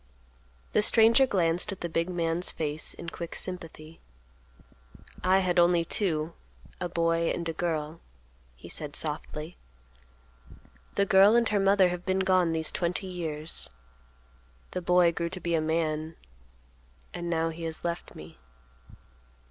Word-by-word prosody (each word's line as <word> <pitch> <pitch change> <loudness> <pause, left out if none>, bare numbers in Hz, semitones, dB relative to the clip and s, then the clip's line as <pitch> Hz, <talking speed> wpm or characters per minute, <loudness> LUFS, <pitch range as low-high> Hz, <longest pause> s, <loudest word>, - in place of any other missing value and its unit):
The - - +4
stranger 230 +5 +5
glanced 175 -3 +2
at 195 - -8
the 170 - -2
big 165 +1 -1
man's 170 0 0
face 155 0 -2
in 170 - -7
quick 170 0 -7
sympathy. 165 -3 -5 1.2
"I 190 +1 +4
had 180 -1 +1
only 170 -1 +4
two; 165 -4 -1 0.5
a 180 - -3
boy 165 0 +1
and 170 - -2
a 165 - -2
girl," 160 -1 -3 0.6
he 65 +7 -13
said 145 - -5
softly. 155 +1 -3 1.4
"The 200 - +2
girl 200 +2 +6
and 235 -1 +4
her 210 - +1
mother 195 -1 +4
have 175 0 -5
been 190 0 0
gone 185 -3 +3
these 160 -1 +1
twenty 175 +2 -2
years. 165 -4 -4 1.0
The 180 - -3
boy 180 0 +4
grew 170 0 -3
to 185 +2 -5
be 170 -1 -2
a 160 - +2
man, 160 0 -1 1.0
and 175 0 -5
now 165 -1 0
he 165 +1 -8
has 160 -1 -5
left 170 0 -4
me." 75 -4 -12
170 Hz, 145 wpm, -28 LUFS, 160-185 Hz, 1.4 s, girl